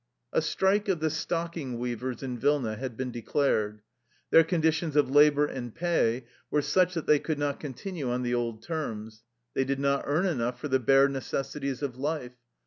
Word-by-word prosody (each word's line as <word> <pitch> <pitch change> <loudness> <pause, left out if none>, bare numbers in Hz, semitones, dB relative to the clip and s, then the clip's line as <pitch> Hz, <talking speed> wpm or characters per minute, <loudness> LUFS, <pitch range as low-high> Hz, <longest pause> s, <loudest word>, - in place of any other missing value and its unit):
A - - +3
strike 200 +2 +1
of 180 -4 +1
the 160 0 0
stocking 165 -5 -3
weavers 125 +1 -3
in 125 -2 -4
Vilna 135 -4 +1
had 125 0 -6
been 130 -1 -3
declared. 110 -4 0 0.5
Their 165 - +8
conditions 160 -2 0
of 145 -3 +3
labor 145 0 +6
and 120 -5 -6
pay 130 -8 +1 0.2
were 150 -1 +1
such 185 +2 +2
that 165 - -2
they 150 - +5
could 155 0 -2
not 145 -1 -1
continue 145 +1 -5
on 125 +1 -1
the 120 0 -1
old 115 -2 -2
terms. 110 -9 -5 0.3
They 135 - +1
did 135 +1 -1
not 140 0 +1
earn 155 +6 +2
enough 125 -8 -1
for 150 - -4
the 130 0 +3
bare 135 +3 +5
necessities 135 0 -3
of 130 -3 -3
life. 145 -3 -2
140 Hz, 185 wpm, -28 LUFS, 125-155 Hz, 0.5 s, Their